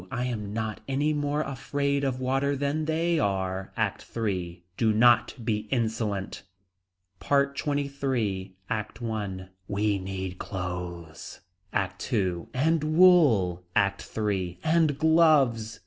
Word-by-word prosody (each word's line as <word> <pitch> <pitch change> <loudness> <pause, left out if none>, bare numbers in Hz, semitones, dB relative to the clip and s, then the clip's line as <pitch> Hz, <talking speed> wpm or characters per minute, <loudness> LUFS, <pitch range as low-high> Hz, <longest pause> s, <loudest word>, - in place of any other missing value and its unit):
I 125 - -2
am 105 -5 -3
not 110 0 -3
any 145 +3 +1
more 145 0 0
afraid 140 +1 -1
of 130 -2 -1
water 135 +2 0
than 145 +3 -1
they 165 +1 +1
are. 95 -3 -1
ACT - - -1
III. 90 -6 -2
Do 110 +1 +2
not 120 +2 +4
be 105 -2 -1
insolent. 110 -5 -2 0.8
PART 140 0 +1
XXIII. 135 -10 -2
ACT 110 -1 -4
I. 100 -5 -4 0.2
We 100 0 0
need 95 -1 -5
clothes. 90 -3 -6 0.3
ACT 95 +5 -3
II. 95 -7 0
And 155 +4 +1
wool. 135 - +5
ACT 100 0 0
III. 95 -5 -1
And 160 -3 +2
gloves. 145 -9 +3
115 Hz, 120 wpm, -27 LUFS, 95-140 Hz, 0.8 s, wool